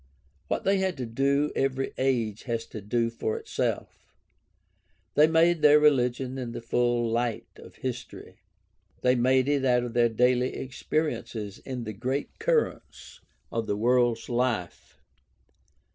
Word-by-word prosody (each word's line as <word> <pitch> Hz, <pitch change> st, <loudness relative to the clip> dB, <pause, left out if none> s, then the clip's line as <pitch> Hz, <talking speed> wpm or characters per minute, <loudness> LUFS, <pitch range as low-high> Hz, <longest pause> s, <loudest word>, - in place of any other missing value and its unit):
What -, -, -2 dB
they 195 Hz, 0 st, +2 dB
had 190 Hz, -3 st, -1 dB
to 125 Hz, -, -3 dB
do 140 Hz, +5 st, +1 dB
every 135 Hz, 0 st, -1 dB
age 120 Hz, -5 st, 0 dB
has 115 Hz, -2 st, -2 dB
to 110 Hz, -, -7 dB
do 115 Hz, +3 st, 0 dB
for 110 Hz, -1 st, -3 dB
itself. -, -, -4 dB, 1.0 s
They 150 Hz, +1 st, +6 dB
made 165 Hz, +1 st, +3 dB
their 150 Hz, 0 st, +7 dB
religion 130 Hz, -3 st, +2 dB
in 120 Hz, -2 st, -5 dB
the -, -, -5 dB
full 120 Hz, 0 st, +1 dB
light 115 Hz, 0 st, -1 dB
of -, -, -14 dB
history. 125 Hz, -1 st, -7 dB, 0.6 s
They 125 Hz, 0 st, +4 dB
made 130 Hz, +1 st, +3 dB
it 145 Hz, -2 st, +1 dB
out 125 Hz, -2 st, +3 dB
of 120 Hz, -1 st, -5 dB
their 120 Hz, -1 st, +3 dB
daily 125 Hz, +2 st, +2 dB
experiences 125 Hz, -6 st, -3 dB
in 130 Hz, -3 st, -6 dB
the 110 Hz, -1 st, -5 dB
great 130 Hz, -, -4 dB
currents 460 Hz, 0 st, -2 dB, 0.3 s
of 115 Hz, -1 st, -2 dB
the 100 Hz, -, -1 dB
world's 120 Hz, 0 st, +2 dB
life. 120 Hz, -7 st, -2 dB
125 Hz, 145 wpm, -27 LUFS, 115-135 Hz, 1.0 s, their